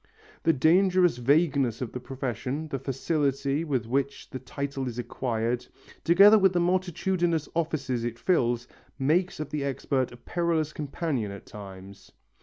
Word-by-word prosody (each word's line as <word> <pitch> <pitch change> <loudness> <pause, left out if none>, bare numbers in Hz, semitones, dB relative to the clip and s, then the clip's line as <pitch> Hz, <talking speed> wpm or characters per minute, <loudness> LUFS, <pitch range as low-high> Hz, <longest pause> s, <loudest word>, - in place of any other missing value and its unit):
The 165 - +4
dangerous 180 +2 +4
vagueness 140 -2 +2
of 125 -4 -4
the 125 - -5
profession, 130 +3 -4
the 135 - -3
facility 140 +2 -1
with 135 -8 -1
which 135 +4 -2
the 130 - -5
title 140 0 -4
is 120 -1 -5
acquired, 120 0 -2 0.4
together 200 +5 +7
with 190 -1 +4
the 175 - +2
multitudinous 175 -2 0
offices 140 -7 -1
it 120 -1 -3
fills, 120 -6 +1 0.3
make 165 +7 +1
of 155 - -5
the 150 -2 -2
expert 135 -1 -1
a 120 - -11
perilous 165 +1 -1
companion 145 - -3
at 100 - -10
times. 100 -1 -11
140 Hz, 145 wpm, -27 LUFS, 125-165 Hz, 0.4 s, together